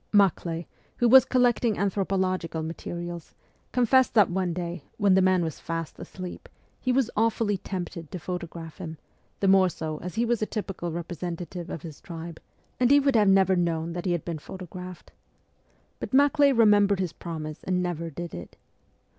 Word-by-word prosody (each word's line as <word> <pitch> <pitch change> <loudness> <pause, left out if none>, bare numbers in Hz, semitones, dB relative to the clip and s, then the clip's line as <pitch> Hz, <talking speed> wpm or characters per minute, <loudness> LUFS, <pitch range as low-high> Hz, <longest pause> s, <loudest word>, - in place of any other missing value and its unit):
Maklay, 175 -4 +2 0.3
who 240 - +3
was 260 +2 +8
collecting 245 -3 +2
anthropological 185 -4 -1
materials, 170 +1 -6 0.4
confessed 255 +1 +3
that 210 -5 +5
one 185 -1 0
day, 170 -2 -4
when 205 -3 +4
the 190 - +5
man 185 -1 +3
was 160 -3 -4
fast 165 -2 -5
asleep, 185 -1 -8 0.3
he 255 - 0
was 255 -2 +2
awfully 225 -1 +1
tempted 175 -4 -6
to - - -5
photograph 170 -1 -6
him, 160 -3 -6 0.4
the 195 - +2
more 190 -1 +6
so 155 -2 -5
as 180 +3 -7
he 230 +1 +1
was 235 -1 0
a 215 - 0
typical 195 -5 -4
representative 175 +1 -5
of 160 - -6
his 160 -4 -9
tribe 165 -1 -8 0.4
and 250 -1 +4
he 285 +1 +7
would 275 -2 +2
have 210 -3 +5
never 190 -1 +5
known 170 -1 -1
that 175 +1 -5
he - - +2
had 175 -3 -1
been 165 -3 -4
photographed. 180 +1 -9 0.9
But - - -3
Maklay 285 0 +5
remembered 205 -5 +4
his 180 -3 -2
promise 155 -3 -6
and 180 -1 0
never 170 -2 -3
did 170 +2 -7
it. 85 - -9
180 Hz, 170 wpm, -26 LUFS, 170-205 Hz, 0.9 s, was